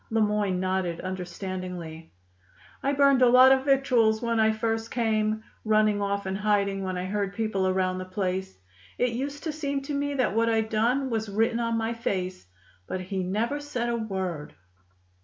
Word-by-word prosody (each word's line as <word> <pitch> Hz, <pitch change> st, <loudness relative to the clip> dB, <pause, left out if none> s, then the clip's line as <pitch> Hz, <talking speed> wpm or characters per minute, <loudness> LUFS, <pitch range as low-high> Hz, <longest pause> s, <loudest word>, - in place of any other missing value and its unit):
Le 225 Hz, -, +1 dB
Moyne 210 Hz, -3 st, +1 dB
nodded 185 Hz, -2 st, -1 dB
understandingly. 180 Hz, -3 st, -6 dB, 0.7 s
"I 275 Hz, -, +1 dB
burned 280 Hz, -2 st, +4 dB
a 250 Hz, -, +7 dB
lot 255 Hz, +2 st, +8 dB
of 265 Hz, 0 st, +3 dB
victuals 250 Hz, -6 st, +3 dB
when 230 Hz, -1 st, 0 dB
I 220 Hz, 0 st, +4 dB
first 225 Hz, +1 st, -2 dB
came, 220 Hz, -2 st, 0 dB, 0.2 s
running 215 Hz, -1 st, +3 dB
off 200 Hz, 0 st, -1 dB
and 190 Hz, 0 st, -2 dB
hiding 200 Hz, -2 st, +1 dB
when 185 Hz, -1 st, -3 dB
I 180 Hz, -, -3 dB
heard 200 Hz, 0 st, -2 dB
people 215 Hz, -4 st, 0 dB
around 185 Hz, 0 st, 0 dB
the 185 Hz, -, -5 dB
place. 190 Hz, 0 st, -3 dB, 0.4 s
It 245 Hz, -1 st, +1 dB
used 280 Hz, +4 st, -4 dB
to 320 Hz, -, -2 dB
seem 280 Hz, -2 st, -3 dB
to 290 Hz, -, -5 dB
me 285 Hz, 0 st, -1 dB
that 255 Hz, -6 st, +1 dB
what 230 Hz, 0 st, +3 dB
I'd 220 Hz, -1 st, +1 dB
done 245 Hz, +5 st, +1 dB
was 220 Hz, -2 st, -2 dB
written 225 Hz, +3 st, +1 dB
on 230 Hz, -1 st, 0 dB
my 225 Hz, +1 st, -1 dB
face. 185 Hz, -, -3 dB, 0.4 s
But 185 Hz, -, -3 dB
he 185 Hz, +1 st, -3 dB
never 220 Hz, +10 st, -1 dB
said 255 Hz, -5 st, -3 dB
a 235 Hz, -, 0 dB
word." 190 Hz, -8 st, -4 dB
215 Hz, 180 wpm, -27 LUFS, 190-235 Hz, 0.7 s, lot